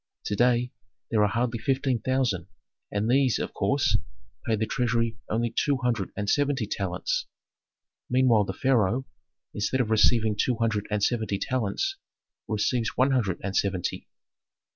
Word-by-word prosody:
To 105 - -2
day 120 +2 +2 0.4
there 110 -2 +3
are 105 - +5
hardly 115 +1 -1
fifteen 130 0 0
thousand, 130 -5 0 0.4
and 105 +1 -1
these, 130 0 +3
of - - -4
course, - - +2 0.5
pay 110 - +3
the 110 +1 -1
treasury 115 -1 0
only 115 +1 0
two 145 -2 +2
hundred 115 -6 0
and 105 -1 -2
seventy 140 0 +1
talents. - - -2 0.8
Meanwhile 125 -4 +4
the 95 - -4
pharaoh, 125 0 +1 0.5
instead 105 +6 -1
of 115 -3 0
receiving 110 0 +4
two 125 +4 +1
hundred 110 -2 -1
and 105 -1 -1
seventy 110 -4 0
talents, 130 - -1 0.5
receives 110 +2 0
one 130 +2 +4
hundred 110 -9 0
and 95 -1 -3
seventy. 95 -3 -1
115 Hz, 145 wpm, -26 LUFS, 105-130 Hz, 0.8 s, are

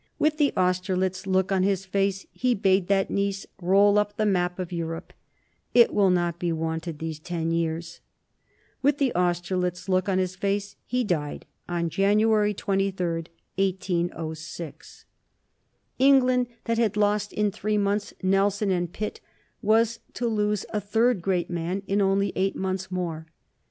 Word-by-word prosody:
With 305 0 +2
the 290 -2 +4
Austerlitz 185 +1 0
look 190 0 +1
on 190 -1 +2
his 195 0 +1
face 195 0 0
he 250 -1 +1
bade 190 -2 +2
that 195 -1 +1
niece 200 0 -1 0.2
roll 200 +3 +5
up 205 0 -2
the 215 - +1
map 180 -3 +1
of 185 -2 -5
Europe: 165 -1 -5 0.6
"It 240 -1 +6
will 200 -2 +4
not 175 -2 +1
be 175 -1 0
wanted 160 0 -3
these 160 0 -5
ten 165 0 -3
years." 165 0 -2 0.8
With 285 +1 +3
the 275 -3 +1
Austerlitz 180 +1 -1
look 185 0 +1
on 190 - +2
his 185 -1 -1
face 200 +1 -2
he 250 0 0
died 155 -8 -2 0.2
on 170 -1 -1
January 210 +2 +3
23, 195 -2 -1 0.5
1806. 170 -4 -3 0.9
England, 255 -2 +4 0.2
that 230 0 0
had 215 -3 +1
lost 205 0 +1
in 210 -1 0
three 210 +2 -1
months 200 0 0
Nelson 195 +1 +2
and 175 -2 -1
Pitt, 210 +3 -5 0.4
was 225 +2 +2 0.2
to 240 - -2
lose 210 -3 0
a 210 - -1
third 225 +1 +2
great 180 -1 -1
man 175 +3 -2
in 200 +1 +1
only 195 0 +2
eight 195 +1 0
months 190 0 -3
more. 170 -3 -4
195 Hz, 150 wpm, -26 LUFS, 175-205 Hz, 0.9 s, It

